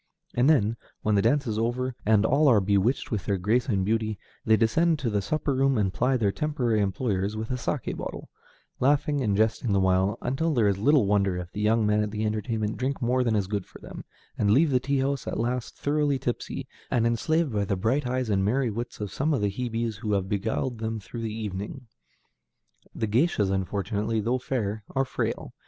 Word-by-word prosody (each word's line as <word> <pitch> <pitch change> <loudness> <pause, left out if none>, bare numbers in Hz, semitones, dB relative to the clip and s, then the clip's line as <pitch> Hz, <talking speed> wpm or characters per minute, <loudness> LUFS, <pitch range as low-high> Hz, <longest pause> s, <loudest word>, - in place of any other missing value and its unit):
And 125 +4 +3
then, 115 -7 +3 0.3
when 110 - +2
the 100 - +4
dance 140 +7 +2
is 110 -2 -2
over, 125 +3 -1
and 110 -1 +4
all 145 +5 +3
are 120 -6 +6
bewitched 100 +8 +1
with 105 -5 -2
their 100 - 0
grace 110 +8 +1
and 95 -4 +1
beauty, 110 0 0 0.3
they 110 0 +4
descend 155 +10 +2
to 130 -6 -2
the 105 -1 +1
supper 145 +6 -1
room 135 0 +2
and 100 -3 +1
ply 130 +1 +2
their 105 -4 +1
temporary 125 -6 0
employers 100 0 -1
with 110 0 -4
the - - -1
saké 125 -2 -2
bottle, - - -6 0.5
laughing 145 +2 +2
and 105 -5 +1
jesting 110 0 +1
the 100 - +3
while, 95 +1 +2
until 155 +5 0
there 115 -4 +3
is 100 -1 +1
little 140 +1 +4
wonder 100 -2 +2
if 90 0 -6
the 105 - -4
young 110 +1 +3
men 105 0 +2
at 105 - -1
the 105 +1 -2
entertainment 110 0 -2
drink 135 +3 -2
more 125 0 +1
than 115 -3 +1
is 100 -2 +1
good 100 0 -3
for - - -13
them, - - -9 0.4
and 100 - +2
leave 140 +8 +4
the 130 - +3
tea 140 +2 -1
house 135 -1 -1
at - - -2
last 120 +1 -2
thoroughly 145 -1 +1
tipsy, 120 -2 -4 0.2
and 115 -1 +1
enslaved 145 +5 +1
by 105 -1 +1
the 100 0 -1
bright 125 +8 0
eyes 130 0 -1
and 95 -1 +2
merry 120 +4 +1
wits 120 +3 -5
of 105 -3 -5
some 150 +2 +1
of 115 - -1
the 105 - +2
Hebes 115 -1 -3
who 105 -1 -2
have 95 -2 0
beguiled 110 +4 -2
them 110 0 -3
through 115 +3 -8
the 110 -1 -3
evening. 105 +3 -5 1.1
The 110 - -1
géishas 110 - +2
unfortunately, 100 +3 -1
though 120 +4 0
fair, 110 -5 -2
are 135 0 +2
frail. - - -3
115 Hz, 215 wpm, -26 LUFS, 105-130 Hz, 1.1 s, are